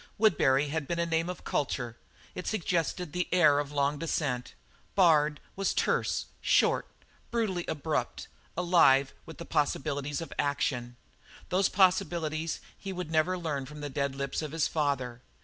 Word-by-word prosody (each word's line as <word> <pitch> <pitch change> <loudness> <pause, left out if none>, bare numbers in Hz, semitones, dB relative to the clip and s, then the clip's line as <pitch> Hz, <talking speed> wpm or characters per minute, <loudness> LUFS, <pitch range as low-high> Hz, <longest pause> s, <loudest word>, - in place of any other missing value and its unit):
"Woodbury" 145 -9 +3
had 155 -1 -2
been 170 - -2
a 170 - +1
name 165 +1 0
of 180 - -6
culture; 120 -4 -2 0.4
it 180 - -6
suggested 175 -4 -1
the 180 0 -1
air 155 -5 +5
of 145 -1 -2
a 145 - -11
long 140 +1 +1
descent. 145 -6 -2 0.4
"Bard" 155 -5 +4 0.2
was 195 0 0
terse, - - +1 0.2
short, - - +3 0.4
brutally 210 -7 -1
abrupt, 155 +1 -2 0.3
alive 165 -7 +4
with 160 - -10
possibilities 145 -1 0
of 165 - -6
action. 125 -4 -1 0.5
Those 190 +1 +2
possibilities 170 -5 +1
he 195 - -7
would 180 -3 -5
never 165 +3 +2
learn 145 -6 -3
from 150 +1 -9
the 145 -1 -5
dead 140 -1 -1
lips 140 +2 -2
of 155 -1 -5
his 165 -2 +1
father. 130 -6 -1
155 Hz, 150 wpm, -29 LUFS, 140-175 Hz, 0.5 s, air